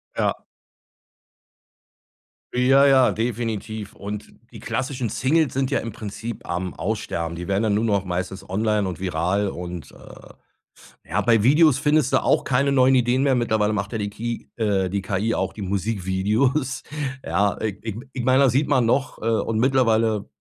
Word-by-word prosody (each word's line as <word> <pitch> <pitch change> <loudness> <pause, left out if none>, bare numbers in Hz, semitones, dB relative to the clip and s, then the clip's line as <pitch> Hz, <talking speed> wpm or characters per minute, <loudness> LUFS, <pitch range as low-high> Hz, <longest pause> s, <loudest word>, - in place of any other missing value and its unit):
Ja. - - 0 2.2
Ja, 135 +3 +5
ja, 130 -2 +5
definitiv. 110 -2 -3
Und 105 +1 -7 0.2
die - - -10
klassischen 130 -4 -2
Singles 145 +6 +1
sind 135 0 0
ja 140 - +1
im 115 - -5
Prinzip 110 +2 -7
am 90 +1 -2
Aussterben. 85 -5 -3
Die 85 +1 -6
werden 100 +2 +1
dann 110 -2 +1
nur 105 +2 +1
noch 100 -4 +1
meistens 95 +2 -4
online 105 +1 0
und 90 -4 -5
viral 95 +3 0
und, 90 -2 -7
äh - - -14 0.8
ja, 100 +6 0
bei 115 0 +3
Videos 150 +2 +5
findest 150 -1 +2
du - - +3
auch - - +2
keine 140 +2 +1
neuen 130 -1 +4
Ideen 125 +1 +2
mehr. 135 -2 +3
Mittlerweile 110 -3 +1
macht 100 0 -3
ja 115 - -2
die 100 0 -2
Ki 115 +3 -5
äh, 100 -5 0
die 100 +2 -2
KI 105 +2 -1
auch - - -2
die 105 - -9
Musikvideos. 105 +7 0 0.4
Ja, 100 -1 0
ich 105 -3 -2
ich 110 -3 -4 0.2
ich 125 - -4
meine, 130 +2 +4
das 135 - +4
sieht 140 +3 +2
man 130 -5 +3
noch 135 +4 0
äh, - - -5
und 110 -1 0
mittlerweile, 115 -5 +2
110 Hz, 170 wpm, -23 LUFS, 100-130 Hz, 2.2 s, Ja